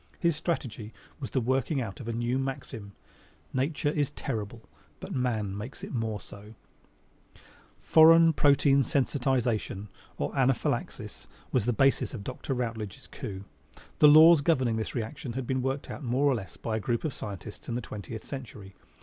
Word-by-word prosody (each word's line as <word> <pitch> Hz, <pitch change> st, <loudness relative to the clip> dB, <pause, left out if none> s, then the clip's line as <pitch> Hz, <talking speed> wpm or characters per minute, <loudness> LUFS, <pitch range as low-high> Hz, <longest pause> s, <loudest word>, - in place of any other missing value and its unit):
His 170 Hz, -2 st, +1 dB
strategy 125 Hz, -9 st, -3 dB, 0.3 s
was 135 Hz, -, -5 dB
the 130 Hz, -, 0 dB
working 130 Hz, +4 st, 0 dB
out 110 Hz, -6 st, -5 dB
of 120 Hz, -, -8 dB
a -, -, -1 dB
new 120 Hz, +3 st, -1 dB
maxim: 130 Hz, -6 st, -5 dB, 0.6 s
Nature 145 Hz, +3 st, 0 dB
is 145 Hz, -2 st, 0 dB
terrible, 115 Hz, -5 st, -5 dB, 0.4 s
but -, -, -7 dB
man 110 Hz, -6 st, -1 dB
makes 110 Hz, +7 st, -7 dB
it -, -, -6 dB
more 110 Hz, -3 st, -2 dB
so. 105 Hz, +3 st, -13 dB, 1.2 s
Foreign 165 Hz, +1 st, +7 dB
protein 140 Hz, -1 st, +4 dB
sensitization 125 Hz, -6 st, 0 dB, 0.3 s
or 70 Hz, -, -3 dB
anaphylaxis 135 Hz, -3 st, -1 dB, 0.2 s
was 125 Hz, -5 st, +1 dB
the -, -, +4 dB
basis 135 Hz, +2 st, +2 dB
of 100 Hz, -, -7 dB
Dr. 130 Hz, +3 st, -4 dB
Rutledge's 115 Hz, -5 st, -4 dB
coup. 95 Hz, -1 st, -7 dB, 0.6 s
The 150 Hz, -, +8 dB
laws 155 Hz, +1 st, +8 dB
governing 130 Hz, -8 st, +2 dB
this 110 Hz, -, -4 dB
reaction 120 Hz, +2 st, -4 dB
had 130 Hz, +1 st, -3 dB
been 130 Hz, +1 st, -1 dB
more 130 Hz, +1 st, +1 dB
or -, -, -1 dB, 0.6 s
less 95 Hz, -9 st, -5 dB
worked -, -, -17 dB
out -, -, -34 dB
by 110 Hz, -2 st, -1 dB
a -, -, -1 dB
group 120 Hz, +2 st, -1 dB
of 155 Hz, -, -2 dB
scientists 105 Hz, 0 st, -8 dB
in 120 Hz, -, -2 dB
the -, -, 0 dB
twentieth 105 Hz, -2 st, -7 dB
century. 110 Hz, -8 st, -8 dB
125 Hz, 165 wpm, -28 LUFS, 110-135 Hz, 1.2 s, The